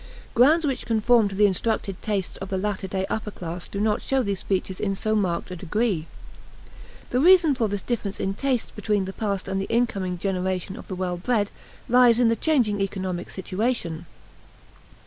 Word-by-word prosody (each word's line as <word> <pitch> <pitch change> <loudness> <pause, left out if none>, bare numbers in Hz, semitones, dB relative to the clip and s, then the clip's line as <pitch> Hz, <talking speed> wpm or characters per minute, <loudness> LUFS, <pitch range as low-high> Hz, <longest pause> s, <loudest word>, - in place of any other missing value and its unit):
Grounds 305 +7 +5
which 270 -3 -2
conform 230 0 +4
to 195 - -5
the 210 +1 +5
instructed 195 -1 -1
tastes 200 -4 -2
of 195 - -7
the 190 - -1
latter 195 0 -2
day 190 0 -2
upper 220 -1 -3
class 175 -3 -6
do 200 - -5
not 210 0 +1
show 270 -1 +1
these 200 -3 -2
features 190 -1 -2
in 195 -2 -1
so 215 +3 -1
marked 185 -3 -1
a - - -4
degree. 185 -1 -1 1.0
The 250 - +2
reason 345 -1 +6
for 235 -4 0
this 200 -1 -3
difference 215 -5 -3
in 195 - -1
tastes 260 +1 -1
between 210 -2 -1
the 190 - -6
past 200 -3 -2
and 195 0 -1
the 195 - -5
incoming 195 -6 0
generation 185 0 -2
of - - -10
the 190 - -4
well 180 -1 -2
bred 205 +2 0 0.4
lies 245 -1 +5
in 240 -2 +5
the 230 - +3
changing 225 -7 +1
economic 185 -2 -3
situation. 185 -4 -2
205 Hz, 185 wpm, -25 LUFS, 190-235 Hz, 1.0 s, reason